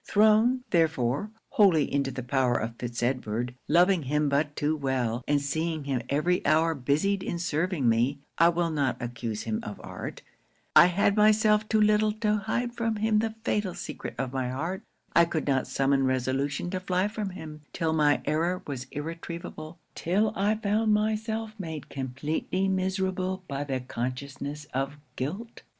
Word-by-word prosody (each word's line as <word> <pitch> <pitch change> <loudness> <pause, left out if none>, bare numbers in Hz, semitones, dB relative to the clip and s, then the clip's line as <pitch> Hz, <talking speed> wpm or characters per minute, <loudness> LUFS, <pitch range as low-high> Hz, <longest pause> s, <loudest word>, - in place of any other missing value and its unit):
'Thrown, 220 +4 +4
therefore, 160 - +1 0.2
wholly 185 -8 +5
into 140 -1 +1
the 130 -1 -5
power 125 -1 +1
of 115 +1 -3
Fitz 120 -1 -4
Edward; 125 -1 -1
loving 180 +1 +4
him 150 +1 +1
but 145 +1 0
too 150 +2 0
well; 130 -4 -1
and 145 0 +3
seeing 160 +2 -2
him 135 -3 -1
every 170 +6 +1
hour 160 +1 +3
busied 155 +9 +1
in 175 - -3
serving 170 -3 0
me 120 +5 +2 0.2
I 170 - +7
will 170 -1 0
not 140 -4 0
accuse 120 -3 -4
him 110 -1 -2
of 105 - -7
art; - - -7 0.5
I 170 +3 +9
had 200 +3 +2
myself 215 0 +4
too 220 - +3
little 215 0 +4
to 210 -1 +1
hide 240 +4 -2
from 230 -2 -1
him 215 0 +2
the 220 0 -1
fatal 205 -5 0
secret - - -6
of 130 0 -3
my 130 -2 -1
heart; 165 +10 -3 0.3
I 170 - +7
could 165 -2 -2
not 135 -2 +1
summon 135 0 +2
resolution 135 +5 -1
to 185 - -1
fly 185 +1 0
from 210 -1 -4
him, 155 -4 -9
till 160 -2 -1
my 150 -2 +3
error 170 +4 0
was 130 -3 -5
irretrievable 165 +1 -6 0.2
till 205 +5 +1
I 205 +3 +2
found 215 0 +2
myself 220 +1 -1
made 160 -5 -6
compleatly 145 +8 -2
miserable 190 0 -1
by 140 +1 -3
the 135 -2 -2
consciousness 135 +4 -5
of 135 +2 -2 0.2
guilt. 190 - -5
160 Hz, 165 wpm, -28 LUFS, 135-195 Hz, 0.5 s, I